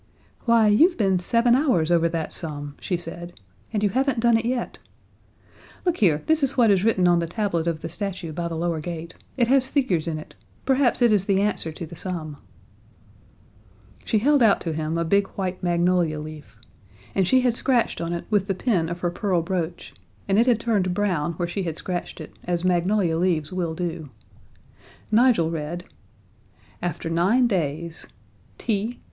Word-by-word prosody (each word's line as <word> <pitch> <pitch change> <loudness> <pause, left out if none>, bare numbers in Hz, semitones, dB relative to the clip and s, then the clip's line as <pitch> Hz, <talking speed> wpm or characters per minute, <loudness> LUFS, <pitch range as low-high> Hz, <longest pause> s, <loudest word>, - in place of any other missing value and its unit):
"Why, 230 -2 +4
you've 320 - +4
been 195 -4 +2
seven 235 +6 +2
hours 245 - +2
over 170 -1 +3
that 165 -1 -3
sum," 145 -3 -4
she 180 - -1
said, 175 -1 -8 0.3
"and 210 -2 -1
you 205 - +3
haven't 265 -1 +1
done 235 0 +4
it 225 0 0
yet. 245 0 -2 1.1
Look 355 -1 +1
here, 160 -8 +2
this 315 0 +3
is 275 -1 +1
what 230 -4 +5
is 190 -1 +2
written 195 -5 +3
on 175 -1 +4
the 170 - -2
tablet 170 -3 -1
of 160 -2 -2
the - - -4
statue 180 -1 -5
by 170 +1 -3
the 165 - -4
lower 165 0 -1
gate. 165 0 -6 0.2
It 240 - +4
has 265 -1 +4
figures 195 - 0
in 160 -2 -2
it. 155 - -10 0.3
Perhaps 260 -2 +2
it 235 - +5
is 200 -3 +3
the 195 -2 +3
answer 200 -5 -1
to 165 - -7
the 165 - -11
sum." 160 -4 -3 1.7
She 220 - +1
held 280 +5 +3
out 220 -4 +5
to 165 - -3
him 155 +1 -2
a 170 - 0
big 200 +3 +2
white 185 -2 -3
magnolia 175 -2 +1
leaf. 150 -8 -10 0.6
And 190 -2 +1
she 260 +4 +4
had 250 -2 +2
scratched 245 -4 +1
on 170 0 -3
it 170 0 -4
with 200 -2 +2
the 195 - -1
pin 180 -6 0
of 175 0 -5
her 175 - 0
pearl 180 -2 0
brooch, 175 -1 -4 0.3
and 195 +1 +3
it 235 - +3
had 240 -3 +3
turned 200 -6 0
brown 175 -5 0
where 175 +1 -3
she 185 +3 -3
had 165 -3 -3
scratched 180 -1 -5
it, 155 - -9
as 175 -1 -1
magnolia 180 -1 +1
leaves 170 -3 0
will 170 -3 -2
do. 165 -3 -4 1.0
Nigel 220 -8 +4
read: 165 +2 -4 1.0
AFTER 175 -1 -3
NINE 195 +10 +3
DAYS 165 -5 -2 0.5
T 230 - -1
ii. 215 +4 -3
180 Hz, 190 wpm, -24 LUFS, 165-220 Hz, 1.7 s, what